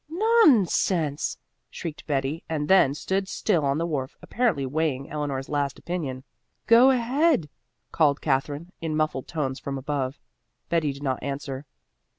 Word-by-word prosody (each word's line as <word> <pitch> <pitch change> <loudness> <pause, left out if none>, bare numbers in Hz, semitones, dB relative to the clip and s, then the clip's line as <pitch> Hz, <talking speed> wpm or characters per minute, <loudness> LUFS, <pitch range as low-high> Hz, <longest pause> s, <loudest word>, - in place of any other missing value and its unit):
"Non 355 - +5
sense!" 160 -4 0 0.3
shrieked 165 -4 -7
Betty 140 +2 -1
and 150 -2 -2
then 185 -8 +5
stood 190 +5 -1
still 185 -5 0
on 140 0 +1
the 165 - 0
wharf, 140 -6 -3
apparently 220 - 0
weighing 140 -1 -1
Eleanor's 145 -3 -3
last 145 -2 -1
opinion. 145 -8 -4 0.4
"Go 235 +3 +7
ahead," 260 - +2 0.4
called 150 -3 +3
Katherine 145 +4 -1
in 160 -2 -2
muffled 155 -4 -1
tones 140 -4 -3
from 140 -1 -4
above. 135 0 -3 0.5
Betty 165 -4 +1
did 140 +1 -9
not 130 -3 -1
answer. 140 0 -5
150 Hz, 145 wpm, -25 LUFS, 140-180 Hz, 0.5 s, Go